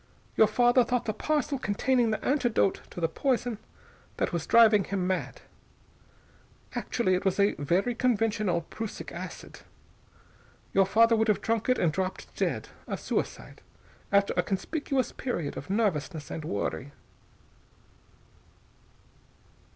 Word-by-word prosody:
Your 220 - +6
father 245 +3 +4
thought 245 0 -1
the 215 - -1
parcel 295 +3 -1
contained 240 +2 +1
the 215 - -3
antidote 240 -8 +1
to - - -8
the 165 - +2
poison 245 - -1 0.6
that - - -1
was 170 -2 -2
driving 220 -3 +6
him 195 -2 -2
mad. 185 0 -2 1.3
Actually, 225 -6 0
it 185 - 0
was 190 +1 0 0.2
very 180 +11 +1
conventional 225 -7 +1
prussic 220 +6 -7
acid. - - -8 1.1
Your 195 -1 +4
father 230 +3 +5
would 220 0 +2
have 210 - +3
drunk 225 +1 -1
it 255 - +4
and 165 -3 +1
dropped 190 +1 -4
dead, - - -2 0.2
a - - -3
suicide, - - -4 0.5
after 200 0 +3
a - - +3
conspicuous 265 - -2
period 170 - -3
of 140 - -8
nervousness 165 -8 -1
and 155 - -5
worry." 135 +3 -3
215 Hz, 130 wpm, -28 LUFS, 185-240 Hz, 1.3 s, Your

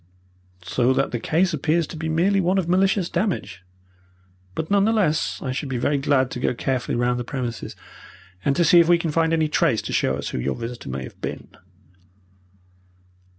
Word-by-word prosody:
"So 125 +6 +1
that - - 0
the 120 - -2
case 170 +8 +1
appears 155 +3 +1
to - - -9
be 160 0 -4
merely 190 +5 +2
one 185 +2 +1
of 185 -3 0
malicious 190 +1 +2
damage. 170 - -2 0.9
But 160 +3 -4
none 200 -1 +4
the 220 - +3
less, 190 -9 +1
I 130 - -2
should 135 +2 -4
be 130 - -2
very 140 +4 +1
glad 135 -2 +1
to - - -5
go 125 - 0
carefully 125 0 -2
round 120 0 +1
the - - -2
premises, 120 -2 -5 0.7
and 140 - +1
to 170 - +3
see 175 +2 +7
if 170 0 +4
we 175 - +6
can 170 -2 -2
find 165 +1 +1
any 160 -1 +2
trace 150 - +1
to - - -5
show 65 - +1
us 70 - -4
who - - -4
your - - -1
visitor 120 - -7
may 65 0 -4
have - - -12
been." - - -6
155 Hz, 200 wpm, -23 LUFS, 125-170 Hz, 0.9 s, see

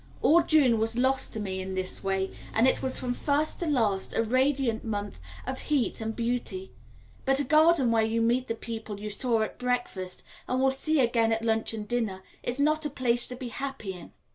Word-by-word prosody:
All 340 +3 +6
June 270 -9 +4
was 225 +1 +1
lost 260 +1 +1
to 220 - -4
me 190 -2 -3
in 190 0 -5
this 185 0 -2
way, 195 0 0 0.2
and 225 +3 +5
it - - +2
was 260 -1 -1
from 245 -1 -2
first 290 +4 0
to 345 - -2
last 220 -10 0
a 225 - +2
radiant 255 -1 +1
month 205 -2 -4 0.3
of 260 +1 -4
heat 285 -6 0
and 220 0 -3
beauty; 245 +11 -2 0.5
but 270 0 +3
a - - +2
garden 305 -2 +4
where 225 -1 +4
you 220 +1 +1
meet 240 +3 +2
the 230 - -2
people 220 -3 -6
you 210 0 -5
saw 225 +1 +1
at - - -6
breakfast, 245 -7 -2 0.2
and 255 - 0
will 265 0 +4
see 310 +3 0
again 230 -2 +3
at 225 0 0
lunch 225 -1 +1
and 210 -1 -6
dinner, 215 -6 -2 0.2
is 245 +3 -3
not 305 +2 +2
a 300 - -1
place 245 -3 0
to 250 - -7
be 250 -1 -6
happy 270 -6 -5
in. 180 -2 -11
240 Hz, 215 wpm, -28 LUFS, 220-270 Hz, 0.5 s, All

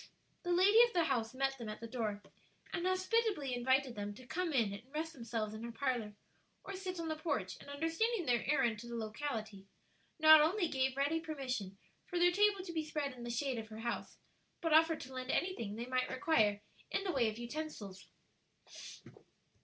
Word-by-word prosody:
The 355 - -2
lady 390 +6 +6
of 480 0 +5
the 345 - +3
house 245 -5 -1
met 270 0 0
them 230 -2 -5
at 215 - -6
the 230 - -7
door, 220 -4 -3 0.5
and 350 +1 0
hospitably 370 - +1
invited 260 +1 +2
them 205 -1 -5
to 255 - -13
come 355 +6 -2
in 230 -8 +2
and 200 - -7
rest 320 +2 -3
themselves 230 -4 -3
in 215 - -7
her 235 - -5
parlor, 230 -4 -2 0.5
or 395 - -6
sit 370 -2 -5
on 330 - -3
the 315 - -1
porch; 285 - -2
and - - -12
understanding 330 +8 0
their 240 -4 +2
errand 235 -7 +2
to 240 - -9
the 235 - -5
locality, 220 -3 -4 0.5
not 315 -1 +9
only 345 +4 +2
gave 265 -2 0
ready 285 +4 +2
permission 260 - -4 0.3
for 355 - -3
their 350 0 +5
table 405 0 +3
to 340 - -6
be 320 -1 -1
spread 300 -3 -3
in 250 - -11
the 240 - -5
shade 250 +1 -1
of 220 - -7
her 220 0 -9
house, 235 0 -4 0.4
but 330 -3 0
offered 320 0 +5
to 265 0 -9
lend 255 0 -5
anything 235 - -1
they 235 +2 -4
might 255 0 0
require 220 -7 +2 0.3
in 390 - -1
the 380 - 0
way 245 -7 +2
of 215 - -7
utensils. 235 -7 -6
270 Hz, 200 wpm, -35 LUFS, 230-325 Hz, 0.5 s, not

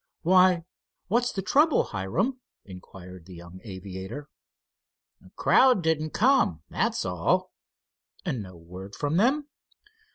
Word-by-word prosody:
"Why, 180 0 +4 0.5
what's 240 +4 +1
the 195 - -4
trouble, 295 - +3
Hiram?" 190 - -2 0.3
inquired 90 -2 -12
the 90 - -11
young 85 +2 -12
aviator. 95 +6 -8 1.1
"Crowd 255 -8 +4
didn't 155 -1 0
come, 220 - +2
that's - - -1
all." 90 -3 0 0.7
"And 125 - -2
no 95 -3 -11
word 90 +4 -10
from 145 +3 -1
them?" 275 +8 +2
140 Hz, 110 wpm, -26 LUFS, -, 1.1 s, Why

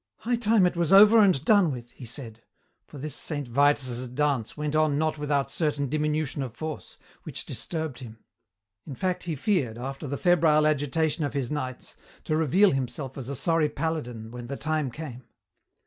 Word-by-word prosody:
"High 240 +2 0
time 220 -4 +4
it 180 - +1
was 170 0 0
over 210 +3 +8
and 185 -9 +4
done 200 -6 +5
with," 120 -2 -7
he 125 - -11
said, 115 -2 -7 0.5
for - - -11
this 145 0 -6
Saint 145 -4 -4
Vitus' 130 -1 +1
dance 135 -2 -1
went 150 0 -2
on 155 -2 +3
not 155 0 0
without 140 -2 0
certain 145 -3 -1
diminution 150 -1 -1
of 125 -4 -5
force, 155 -1 -7 0.2
which - - -7
disturbed 160 -6 -4
him. 115 -4 -10 0.7
In 140 - -6
fact 185 +5 -2
he 165 -3 -2
feared, 135 - 0
after 135 +4 -6
the 140 +1 -3
febrile 160 -3 +4
agitation 155 +2 +1
of 145 - -2
his 135 -4 -2
nights, 130 -4 -5 0.3
to 155 - -1
reveal 170 +6 +4
himself 135 0 -3
as 130 -2 -6
a 140 - -3
sorry 165 +2 +1
paladin 125 -9 -4
when 120 0 -8
the 140 +2 -5
time 155 -3 -1
came. 130 -2 -8
150 Hz, 180 wpm, -26 LUFS, 130-160 Hz, 0.7 s, over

